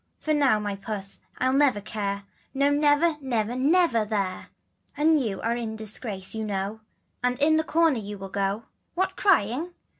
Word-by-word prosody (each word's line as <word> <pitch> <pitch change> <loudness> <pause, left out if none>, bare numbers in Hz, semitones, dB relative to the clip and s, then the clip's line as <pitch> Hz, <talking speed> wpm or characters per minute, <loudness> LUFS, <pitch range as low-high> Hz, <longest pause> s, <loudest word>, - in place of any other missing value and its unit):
For 310 - -3
you 280 -8 +3
my 205 -1 -3
puss 195 -1 -4 0.2
I'll 260 0 +1
never 275 -6 +4
care, 200 -1 -3 0.3
No 280 +1 +3
never, 295 +2 +3
never, 240 -3 -1
never, 280 -3 +3
Mere, 195 -4 -2 0.5
And 310 0 +4
you 210 -6 -2
are 230 +1 0
in 225 -2 -4
disgrace 215 -2 -4
you 220 0 -3
know, 200 +1 -3 0.4
And 250 0 +1
in 315 +2 +4
the 315 - +2
corner 320 -5 +2
you 205 -1 -6
must 195 0 -9
go. 200 +2 -1 0.3
What 375 +1 0
crying? 335 - +2
235 Hz, 170 wpm, -26 LUFS, 205-295 Hz, 0.5 s, never